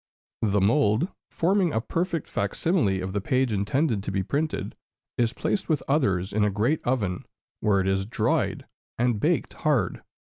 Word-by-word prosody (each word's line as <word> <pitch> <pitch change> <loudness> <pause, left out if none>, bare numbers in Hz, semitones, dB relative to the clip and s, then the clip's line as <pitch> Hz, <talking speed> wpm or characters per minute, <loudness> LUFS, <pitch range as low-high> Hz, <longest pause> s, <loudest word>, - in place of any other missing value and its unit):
The 105 -2 +2
mould, 110 - +3 0.2
forming 185 0 +2
a 110 - +1
perfect 170 +6 -2
fac 100 -1 -2
simile 105 - +1
of 95 0 -4
the 100 - -1
page 130 +2 +1
intended 105 +3 +1
to 95 - -4
be 95 -1 0
printed, 150 - -2 0.4
is 115 -1 +1
placed 195 - -2
with 155 -4 +1
others 100 - +1
in 105 0 +2
a 105 - +3
great 110 +10 0
oven, 105 -8 -1 0.4
where 105 -2 +2
it 95 - -1
is 95 0 0
dried - - 0 0.3
and 120 -2 +1
baked - - +1
hard. - - 0
110 Hz, 170 wpm, -26 LUFS, 100-150 Hz, 0.4 s, mould